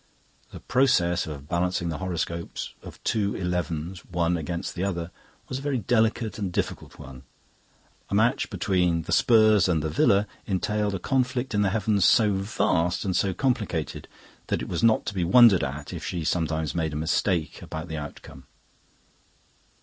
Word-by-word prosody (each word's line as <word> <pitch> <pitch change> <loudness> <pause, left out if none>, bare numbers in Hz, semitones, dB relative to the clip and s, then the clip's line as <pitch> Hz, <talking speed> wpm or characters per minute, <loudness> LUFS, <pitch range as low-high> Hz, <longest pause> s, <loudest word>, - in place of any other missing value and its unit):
The - - -10
process 110 -11 +2
of 70 -2 -8
balancing 85 0 -1
the 80 - -4
horoscopes 85 -2 -4
of - - -11
two 100 -3 0
elevens 90 -1 -3
one 85 -1 0
against 85 +3 -4
the 90 - -3
other 90 -3 -3 0.4
was 130 - -4
a - - -9
very 140 -2 -1
delicate 110 0 0
and 100 -3 -2
difficult - - -4
one. 65 -1 -11 0.9
A - - -1
match - - +2
between 90 -3 +1
the - - -7
Spurs 110 -5 +5
and 80 -4 +1
the 80 - -2
Villa 100 +6 +3 0.2
entailed 105 +1 -1
a - - -1
conflict 130 +1 -1
in 105 - +2
the 100 - +2
heavens 105 -1 +1
so 105 0 +5
vast 95 -3 0
and 95 -2 -1
so 95 - +2
complicated 110 - -2 0.4
that - - -1
it - - -6
was - - -2
not 115 -1 +3
to 105 - -3
be 95 -3 -1
wondered 100 +1 +6
at 70 +3 -5
if - - -6
she 85 -2 -3
sometimes 80 -1 -1
made 80 -3 -1
a - - -4
mistake 80 +2 -1
about 80 +2 -6
the 80 -2 -5
outcome. 75 -1 -9
90 Hz, 170 wpm, -26 LUFS, 85-105 Hz, 0.9 s, wondered